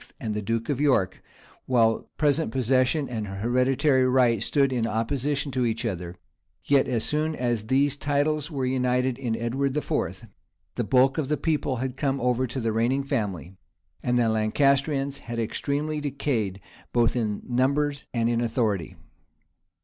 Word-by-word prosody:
and 110 - -3
the 105 - -2
duke 115 +2 -2
of 145 -2 -1
York, 130 -11 +2 0.5
while 115 -3 +2
present 150 -3 +1
possession 130 +3 +1
and 110 -4 -4
hereditary 130 +7 +2
right 125 -4 +3
stood 135 +2 +2
in 115 -2 0
opposition 140 +5 -1
to 130 -1 0
each 115 0 -1
other, 90 -5 -4 0.5
yet 140 -1 +3
as 120 -4 -1
soon 155 +1 -1
as 120 -5 -1
these 140 +3 +2
titles 145 +1 0
were 135 -5 -2
united 125 0 0
in 120 -4 -1
Edward 130 +5 -1
IV., 150 - -2 0.5
the - - -2
bulk 130 +3 +3
of 145 - -1
the 150 - +1
people 150 -4 0
had 130 +1 -4
come 135 -1 0
over 125 +1 +1
to 130 - -4
the 115 -2 0
reigning 120 +5 +1
family; 95 - -3 0.5
and 125 0 +1
the 120 -2 +3
Lancastrians 140 +5 +1
had 120 0 -6
extremely 145 +6 -2
decayed, 130 -9 -2 0.3
both 120 -1 +2
in 110 -4 -2
numbers 140 +3 0
and 115 -2 0
in 120 0 +1
authority. 110 -7 -1
130 Hz, 155 wpm, -26 LUFS, 115-140 Hz, 0.5 s, right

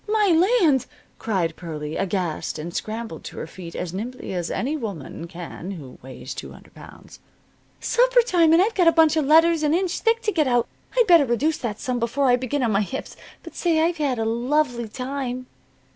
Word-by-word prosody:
"My 425 -2 +3 0.3
land!" 275 -6 +3 0.3
cried 180 -7 -1
Pearlie, 155 -3 -6
aghast, 185 -4 -2
and 170 +3 -6
scrambled 220 -5 -5
to - - -8
her - - -4
feet 170 +1 -10
as 175 -1 -4
nimbly 235 +3 -5
as 175 -2 -2
any 280 +5 -2
woman 190 - -6
can 175 0 -8
who 150 -10 -9
weighs 130 +1 -8
two - - -8
hundred - - -17
pounds. - - -14 0.6
"Supper - - +3
time, 345 -9 +3
and 335 +3 +6
I've 445 +3 0
got 360 -4 +3
a - - +8
bunch 320 -1 +4
of 310 -3 +1
letters 325 +2 +5
an 305 +1 +2
inch 365 0 -1
thick 460 0 +1
to 425 - +1
get 310 -7 +1
out! 245 -2 +2 0.3
I'd 485 - +5
better 340 -7 +6
reduce 285 +7 +1
that 215 -3 -4
some 250 -1 -2
before 245 +4 0
I 250 -2 +5
begin 255 +2 -2
on 230 - +1
my 200 0 +2
hips. 265 +6 -5 0.3
But - - -10
say, 335 -3 +1
I've 335 +2 +1
had 280 -5 0
a 225 - -1
lovely 240 0 0
time." 255 +1 -4
255 Hz, 205 wpm, -23 LUFS, 195-320 Hz, 0.6 s, a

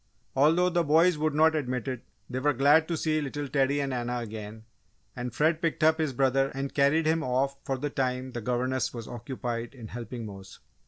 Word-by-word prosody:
'" - - -41
Although 160 +6 +4
the 175 0 +2
boys 165 +3 +4
would 155 -1 0
not 160 +1 +5
admit 130 -4 -2
it, 130 -3 -4 0.2
they 130 0 -3
were 145 +2 +2
glad 145 +5 +4
to 170 - -1
see 155 0 0
little 145 0 -4
Teddy 140 +1 +1
and 140 -2 -1
Anna 125 0 -2
again, 110 -1 -7 0.5
and 125 0 -4
Fred 160 +2 +1
picked 165 -2 -1
up 160 +1 +4
his 155 -3 0
brother 135 +1 +2
and 135 0 -3
carried 145 +3 +3
him 160 +1 +2
off 135 0 0
for 135 - -2
the 145 +2 -3
time 130 -1 -2
the 120 - -5
governess 125 +3 -1
was 115 -2 -6
occupied 120 0 -5
in 115 -4 -9
helping 120 0 -6
Mose. 95 -2 -10
135 Hz, 210 wpm, -28 LUFS, 125-155 Hz, 0.5 s, not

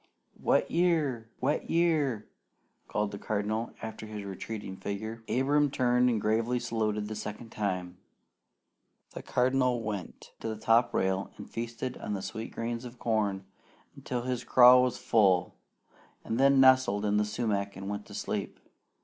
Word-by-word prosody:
"Wet - - +2
year! 155 -10 +1
Wet 140 +4 0
year!" 155 -10 +1 0.6
called 105 -1 -1
the 100 - -7
Cardinal 110 +3 -2
after 110 -1 -6
his 105 -2 -6
retreating 100 0 -6
figure. 110 +4 -5
Abram 145 +3 +2
turned 125 -1 +2
and 115 -3 +1
gravely 115 +4 +1
saluted 105 -3 -1
the 110 - -5
second 105 +2 -7
time. 90 -3 -3 1.1
The - - -7
Cardinal 125 -1 +1
went 100 -5 -6
to - - -5
the 110 -1 -3
top 115 +2 +3
rail 95 +1 0
and - - -9
feasted 120 +2 -5
on 105 - -3
the 95 - -5
sweet 110 +1 -5
grains 115 +1 -4
of 125 0 -9
corn 105 -5 -1 0.5
until 120 -1 -4
his 125 -1 -2
craw 125 0 +8
was 125 -1 0
full, 95 -6 +3 0.7
and 115 - -2
then 140 0 +5
nestled 130 -6 +5
in 105 0 +2
the 105 - +3
sumac 105 -2 -2
and 95 0 -7
went 105 0 -5
to - - -10
sleep. - - -4
115 Hz, 155 wpm, -29 LUFS, 105-125 Hz, 1.1 s, craw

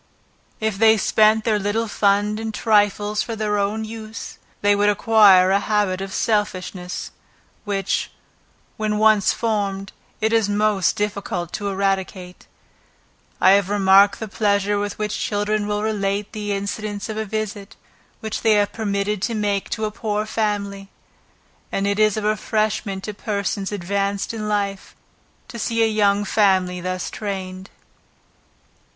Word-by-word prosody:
If 220 -3 -2
they 220 0 +6
spent 215 +1 +3
their 215 -2 +1
little 205 +3 -1
fund 205 +1 +1
in 225 0 -3
trifles 210 -1 +1
for 230 - -4
their 210 -1 -1
own 210 +2 -1
use, 220 0 -8 0.2
they 205 0 +4
would 205 +1 +3
acquire 205 -3 +5
a 200 - +4
habit 205 -3 0
of 195 0 -5
selfishness; 185 -4 -2 0.5
which, 200 -2 -1 0.7
when 215 -1 -1
once 215 -2 +4
formed, 200 -4 -2 0.3
it 220 +1 0
is 225 -3 +2
most 205 -2 +2
difficult 200 -5 -3
to 205 -1 -3
eradicate. 190 -2 -3 0.9
I 185 - +6
have 200 -1 +3
remarked 200 0 +5
the 220 - -4
pleasure 205 -1 +1
with 205 0 -3
which 210 -1 -3
children 205 0 -1
will 210 0 -1
relate 205 -1 -1
the 210 -2 -4
incidents 205 +1 -3
of 220 - -5
a 220 - -1
visit, 210 -1 -5 0.5
which 220 -2 -4
they 220 -2 +4
have 205 -1 +2
been - - -17
permitted 200 -2 -1
to 230 +2 -1
make 205 -2 -1
to 220 - -2
a 210 - -3
poor 210 0 -2
family; 200 -3 -2 0.8
and 195 - -1
it 200 +1 0
is 215 -1 +3
a 215 - -2
refreshment 215 -2 -1
to 210 - -5
persons 200 -2 -3
advanced 200 +2 -2
in 215 -2 -4
life, 200 -2 -2 0.5
to 235 - -8
see 230 +1 +1
a - - +4
young 205 -1 +2
family 190 -3 +2
thus 185 0 -3
trained. 190 -2 -5
205 Hz, 150 wpm, -21 LUFS, 195-215 Hz, 0.9 s, they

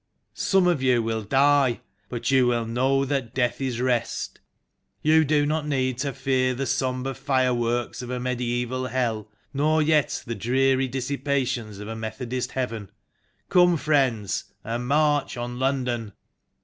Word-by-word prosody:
Some 190 -2 +2
of 175 -6 +2
you 125 -3 +3
will 110 0 -1
die, 135 +1 +3 0.3
but 120 +1 -2
you 130 -2 +4 0.2
know 130 +4 +1
that 135 -4 -2
death 125 0 0
is 130 -3 -2
rest. 120 -2 -1 0.6
You 160 +1 +5
do 145 0 +2
not 150 0 -1
need 130 -3 0
to 140 0 -1
fear 130 -1 0
the 135 +2 -2
sombre 130 0 -1
fireworks 125 -3 0
of 125 - -7
a 125 0 -2
mediaeval 125 0 -2
Hell, 115 -4 -2 0.2
nor 155 +3 +2
yet 150 -1 +2
the 115 - -3
dreary 130 +3 +2
dis 130 +1 -4
sipations 130 -6 -1
of 105 - -7
a 115 - -5
Methodist 115 +3 -4
Heaven. 115 -6 -3 0.6
Come, 175 -1 +5
friends, 135 - +1 0.2
and 120 +2 -3
march 145 -1 +2
on 120 +1 -5
London 125 -5 -1
130 Hz, 150 wpm, -25 LUFS, 120-140 Hz, 0.6 s, You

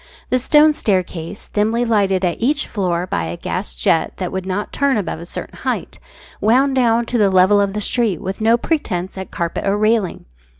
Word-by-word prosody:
The 255 - +3
stone 300 +4 +5
staircase, 185 - -2
dimly 220 +3 0
lighted 195 -4 +2
at 175 +3 -2
each 285 +5 +1
floor 180 -4 -1
by 85 - -2
a 85 +1 -5
gas - - -4
jet 110 - +1
that 180 -2 -3
would 190 0 -4
not 195 +2 -3
turn 280 -3 +1
above 195 -5 -3
a 170 - -9
certain - - -7
height, - - -3 0.4
wound 260 +6 +3
down 235 -2 +2
to 240 0 -1
the 205 -2 +4
level 190 +2 +4
of 200 -1 0
the 210 - -3
street 220 -4 0
with 195 +1 -5
no 225 +2 +4
pretence 220 - -2
at 190 -1 -7
carpet 170 -1 -3
or 200 +1 +2
railing. 215 -2 0
205 Hz, 200 wpm, -19 LUFS, 185-235 Hz, 0.4 s, stone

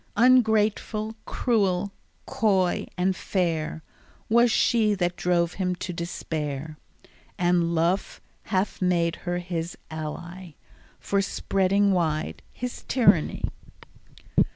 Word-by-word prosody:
Ungrateful, 220 -3 +3
cruel, 200 -5 +1 0.3
coy, 190 -5 +1
and 185 +1 +1
fair, 165 -5 -1 0.5
Was 235 +2 +5
she 220 -2 +3
that 175 -2 -1
drove 175 -1 +1
him 180 -2 -1
to 180 +1 -5
despair, 155 -3 -4 0.6
And 175 -1 +2
Love 170 +4 0 0.3
hath 195 -1 -1
made 170 -2 +1
her 175 0 0
his 175 -1 -4
ally 165 +2 -7 0.4
For 200 0 0
spreading 195 0 +1
wide 160 -4 -1
his 250 0 -6
tyranny. 255 -3 +3
180 Hz, 100 wpm, -26 LUFS, 170-205 Hz, 0.6 s, Was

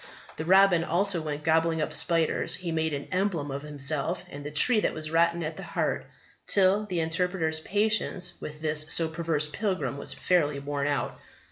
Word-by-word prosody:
The 155 - -4
robin 190 -1 +5
also 180 +1 +1
when 150 -1 -5
gobbling 160 +1 +2
up 155 - -2
spiders 165 0 +1
he 180 -2 -5
made 160 -2 -1
an 140 - -6
emblem 185 -7 -1
of 140 +1 -4
himself, 150 +4 -1
and 145 0 -8
the 145 - -5
tree 215 +10 +4
that - - -1
was 155 -1 -4
rotten 170 +1 +2
at 155 +1 -5
the - - -7
heart, - - -2 0.4
till 200 +2 +3
the 180 -4 -2
Interpreter's 165 -1 0
patience 200 -2 0
with 150 0 -8
this 155 0 0
so 165 - +4
perverse 160 -2 -1
pilgrim 185 -4 -2
was - - -3
fairly 150 -6 +1
worn 140 0 -3
out. 140 -4 -2
160 Hz, 180 wpm, -27 LUFS, 150-180 Hz, 0.4 s, robin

